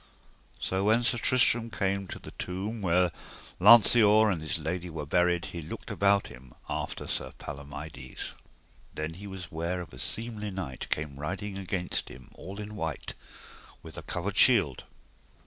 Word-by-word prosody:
So 95 +1 -1
when 110 +3 +4
Sir 120 0 +3
Tristram 120 -1 +3
came 100 -2 -1
to - - -6
the - - -10
tomb 100 +5 -4
where 90 -1 +3 0.5
Lanceor 110 +1 +7
and 85 -4 -2
his 80 0 -2
lady 85 +3 -3
were 80 -2 -5
buried 90 +2 +2
he 85 - -4
looked 75 - -7
about 100 0 +3
him 65 -1 -13
after - - -4
Sir - - -3
Palomides. 70 -2 -7 0.6
Then 75 +1 -2 0.2
was 95 -1 -7
he 80 - -14
ware 85 +3 -1
of 85 - -8
a 65 - -10
seemly 110 - -4
knight 95 -9 -5
came 75 -2 -2
riding 95 +6 -4
against 95 -2 -3
him 65 +1 -13
all 100 +2 -8
in 105 0 -6
white, 80 -8 -4 0.7
with - - -10
a - - -6
covered 95 +3 -3
shield. 95 - +5
90 Hz, 160 wpm, -29 LUFS, 80-105 Hz, 0.7 s, Lanceor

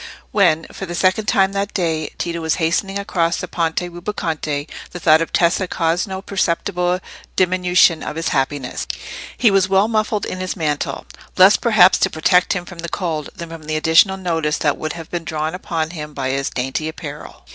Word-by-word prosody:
When, 170 -6 +3
for 195 - -7
the 175 - -5
second 185 +4 +1
time 195 0 +3
that 200 0 -3
day, 160 -4 -1
Tito 170 -1 -3
was 160 -1 +1
hastening 185 +4 0
across 170 -4 0
the - - -4
Ponte 165 -1 -1
Rubaconte, 170 -5 -3 0.2
the 175 - -8
thought 160 -1 +5
of 165 - -2
Tessa 175 +2 +2
caused 170 +2 0
no 190 0 -6
perceptible 180 -1 0 0.4
diminution 180 -2 +3
of - - -5
his 165 0 -1
happiness. 135 -1 -2 0.5
He 230 -4 +4
was 195 -1 +3
well 195 +2 +4
muffled 215 -2 0
in 185 - -5
his 185 0 -3
mantle, 150 -5 -2 0.3
less, 190 +2 +8
perhaps, 215 -6 +5
to - - +3
protect 180 +3 +3
him 180 -2 -4
from 175 -1 -11
the 170 0 -5
cold 160 -6 -3
than 170 -1 -7
from 165 -2 -9
the 155 0 -2
additional 160 +5 +4
notice 165 -5 -1
that 145 -2 +1
would 155 -1 -4
have 165 -2 -9
been 175 -1 -3
drawn 155 0 -3
upon 165 -4 -3
him 150 -3 -7
by 130 -2 -2
his 135 0 -1
dainty 135 +5 -2
apparel. 150 -2 -9
170 Hz, 190 wpm, -19 LUFS, 155-185 Hz, 0.5 s, less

